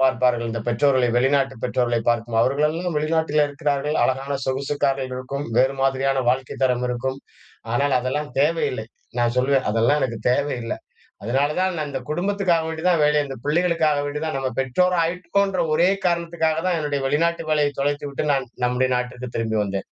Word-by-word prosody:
பார்ப்பார்கள் 125 -2 +2
இந்த 115 0 -3
பெற்றோர்களை 130 +2 +3
வெளிநாட்டு 135 +1 +2
பெற்றோர்களை 120 -2 +1
பார்க்கும், 115 -1 0
அவர்களெல்லாம் 150 +6 0
வெளிநாட்டிலே 155 -1 +2
இருக்கிறார்கள். 145 0 -1
அழகான 135 +2 0
சொகுசுக்கார்கள் 135 0 -1
இருக்கும். 135 +2 -4
வேறு 130 +2 +3
மாதிரியான 135 0 +1
வாழ்க்கை 130 +1 0
தரம் 125 -1 +2
இருக்கும். 130 +2 -2 0.6
ஆனால் 140 +2 +2
அதெல்லாம் 140 +4 -2
தேவையில்லை. 145 -7 +1 0.3
நான் 120 0 +1
சொல்லுவேன் 130 +1 +2
அதெல்லாம் 115 +7 +2
எனக்கு 115 -3 -2
தேவை 140 +2 0
இல்ல. 115 - -3 0.5
அதனால 135 +6 +1
தான் 185 -1 +1
நான் 150 -1 -2
இந்த 135 -1 -3
குடும்பத்துக்காக 180 -1 +1
வேண்டிதான் 160 0 +1
வேலை 150 0 +3
அந்த 135 -1 -7
பிள்ளைகளுக்காக 160 -2 +2
வேண்டிதான். 150 +1 -3
நம்ம 135 -1 -1
பெற்றோர் 180 +8 +1
ஆயிருக்கோன்ற 180 +2 0
ஒரே 170 +3 +4 0.2
காரணத்துக்காக 170 -2 0
தான் 180 - +1
என்னுடைய 145 -2 -1
வெளிநாட்டு 165 +4 +1
வேலையை 150 -2 +2
தொலைத்து 145 +1 -1
விட்டு, 140 - -3
நான் 135 -2 -1 0.2
நம்முடைய 125 +1 +1
நாட்டிற்கு 125 0 -4
திரும்பி 110 -1 -1
வந்தேன். 100 -1 -3
140 Hz, 155 wpm, -22 LUFS, 130-155 Hz, 0.6 s, ஒரே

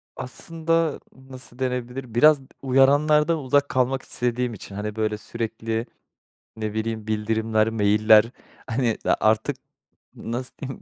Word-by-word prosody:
Aslında 165 +3 -2
nasıl 130 -1 -13
denebilir? 125 -1 -4
Biraz 150 +3 +6
d 135 - -18
uyaranlardan 145 +4 +4
uzak 145 +1 +1
kalmak 130 +1 +1
istediğim 125 0 -2
için. 100 -1 -9
Hani, 105 +1 -4
böyle, 110 -1 -1
sürekli 115 +1 -4 0.7
ne 110 -1 -4
bileyim 110 0 -3
bildirimler, 110 0 0
mail'ler, 110 0 +5 0.4
hani, 115 -1 0
a - - +3
artık 110 0 +2 0.6
n - - -7
nasıl 125 +2 -4
diyeyim, 135 -2 -6
120 Hz, 130 wpm, -24 LUFS, 110-135 Hz, 0.7 s, Biraz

